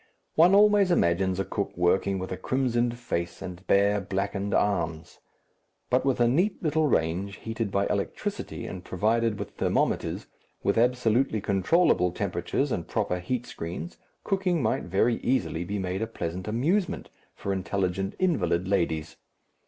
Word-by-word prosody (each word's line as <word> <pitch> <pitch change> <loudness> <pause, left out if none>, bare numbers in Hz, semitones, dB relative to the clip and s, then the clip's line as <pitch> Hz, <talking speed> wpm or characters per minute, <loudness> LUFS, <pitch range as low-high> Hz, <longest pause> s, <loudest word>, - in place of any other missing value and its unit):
One 175 +4 +6
always 205 -2 +5
imagines 95 - +2
a 95 - 0
cook 100 0 -3
working 95 +2 +2
with 95 0 -5
a - - -1
crimsoned 120 -2 0
face 85 -8 -3
and 90 0 -8
bare 100 +1 +3
blackened 100 +1 -2
arms. 85 -6 -1 0.7
But 130 +1 +3
with 135 -2 +1
a 120 - +5
neat 180 - +1
little 155 0 +2
range, 95 - 0
heated 115 +1 -4
by 100 +1 +1
electricity - - -3
and 90 - -7
provided 110 +4 +1
with - - -6
thermometers, - - 0 0.4
with - - +2
absolutely 120 0 +2
controllable 100 - +3
temperatures 100 +9 -2
and 85 - -2
proper 90 - -1
heat 120 +7 -2
screens, 90 - -6 0.3
cooking 185 -6 0
might 110 - 0
very 100 +6 +2
easily 120 -9 0
be 100 +4 -3
made 95 0 -2
a 110 - -1
pleasant 90 -3 -5
amusement 160 - 0 0.2
for 100 - -3
intelligent 95 +1 -2
invalid 160 - +1
ladies. 85 -5 -1
100 Hz, 145 wpm, -27 LUFS, 90-125 Hz, 0.7 s, One